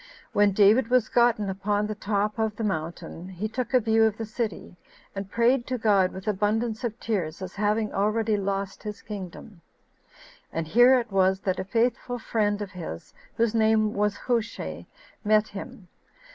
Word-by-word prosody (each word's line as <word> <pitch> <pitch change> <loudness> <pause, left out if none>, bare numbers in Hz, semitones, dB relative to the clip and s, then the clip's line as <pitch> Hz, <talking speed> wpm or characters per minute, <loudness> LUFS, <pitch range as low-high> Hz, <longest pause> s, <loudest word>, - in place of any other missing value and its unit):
When 205 0 +4
David 210 +5 +5
was 245 -2 +2
gotten 235 -4 +3
upon 205 +2 -1
the 215 - -3
top 210 +1 -1
of 220 -1 0
the 225 - -4
mountain, 170 -1 -4
he 190 +3 -4
took 240 +2 -4
a 255 - +5
view 225 -1 +3
of 220 -1 0
the 225 - -4
city; 215 -5 -4 0.4
and 195 0 -5
prayed 235 +3 +2
to 255 - -1
God 200 -5 +3
with 190 +1 -9
abundance 215 +3 0
of 235 0 -3
tears, 175 -8 -2
as 185 -1 -7
having 210 +1 0
already 215 +2 +1
lost 195 -1 -3
his 210 -1 -7
kingdom; 195 -2 -8 0.9
and 165 0 -2
here 245 +9 +6
it 230 -3 -6
was 190 0 +2
that 185 -1 -1
a - - -1
faithful 235 +4 0
friend 210 -3 0
of 200 - -8
his, 165 - -8 0.2
whose 230 -1 +2
name 220 -1 +3
was 205 0 0
Hushai, 230 -2 -3 0.4
met 215 0 +3
him. 195 -1 -9
210 Hz, 170 wpm, -26 LUFS, 195-225 Hz, 0.9 s, here